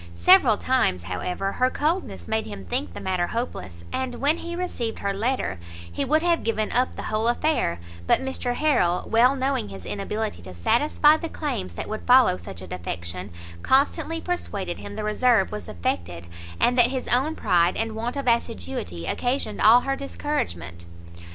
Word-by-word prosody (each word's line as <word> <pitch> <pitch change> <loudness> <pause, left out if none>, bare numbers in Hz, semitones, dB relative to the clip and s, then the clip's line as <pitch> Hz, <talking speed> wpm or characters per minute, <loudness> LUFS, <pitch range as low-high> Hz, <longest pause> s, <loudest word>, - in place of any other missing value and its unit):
Several 85 0 +6
times, 90 -1 +1
however, 180 - -3
her 255 +4 +2
coldness 325 +8 -2
made 220 0 -1
him 95 - -8
think 85 0 -3
the - - -5
matter 185 -2 -1
hopeless; 95 - -5
and 260 -2 -2
when 285 +6 +2
he 340 0 -6
received 255 -11 -3
her 200 0 -2
letter, 215 - -1 0.3
he 85 - -2
would 310 +4 +2
have 345 -1 +2
given 220 -1 -1
up 250 +1 +1
the - - -6
whole 215 +1 -1
affair; 240 - +1 0.3
but - - +4
Mr 265 -2 -3
Harrel, 240 - +1
well 245 +4 +4
knowing 265 - -1
his 95 -2 -9
inability 210 - -3
to 90 +1 -10
satisfy 295 - +3
the 330 0 -5
claims 90 - -4
that - - -5
would 215 0 -4
follow 250 - +6
such 90 +1 -9
a - - -9
defection, 90 +1 -5 0.3
constantly 285 - +2
persuaded 205 - -3
him 205 - -8
the 215 - -4
reserve 215 -1 +2
was 210 - -6
affected, 85 0 -3 0.3
and 245 +1 +3
that 240 - +7
his 260 -1 -4
own 275 +6 +2
pride 175 0 +2
and 225 0 -2
want 235 +3 -3
of 280 -2 -4
assiduity 85 - -2
occasioned 250 - -2
all 230 +3 +7
her 275 +1 -1
discouragement. 85 - -4
220 Hz, 175 wpm, -24 LUFS, -, 0.3 s, that